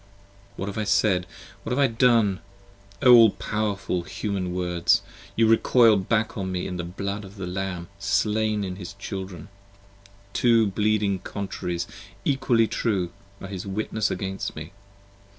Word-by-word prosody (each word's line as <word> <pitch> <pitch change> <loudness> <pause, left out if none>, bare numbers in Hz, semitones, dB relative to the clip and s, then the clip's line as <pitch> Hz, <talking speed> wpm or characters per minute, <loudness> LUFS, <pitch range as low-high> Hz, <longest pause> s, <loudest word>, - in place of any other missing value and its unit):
p. - - -4
24 - - -1
WHAT - - -7
have 100 - -5
I - - 0
said? 95 -3 +2 0.3
What - - -6
have - - -1
I 140 - +5
done? 115 -5 +3 0.6
O 125 - +8
all 115 -2 +9
powerful 100 -3 -2
Human 95 0 -3
Words! 90 -1 +1 0.3
You 115 0 +4
recoil 115 0 +5
back 105 +3 0
upon 95 -3 -4
me 90 -1 -2
in 90 -1 -4
the 85 - -3
blood 100 +4 -4
of 100 +1 -12
the 95 -3 -5
Lamb 90 -1 -4
slain 105 +2 +1
in 90 -1 -4
his 95 -1 -8
Children: 95 -4 -7 0.9
Two 115 -2 +4
bleeding 105 -1 +1
Contraries, 90 -3 -4 0.4
equally 130 -5 +3
true, 100 -6 -1 0.3
are - - -7
his 95 0 -6
Witnesses 110 +2 -1
against 95 +1 -4
me. 80 +1 -8
100 Hz, 155 wpm, -25 LUFS, 95-110 Hz, 0.9 s, all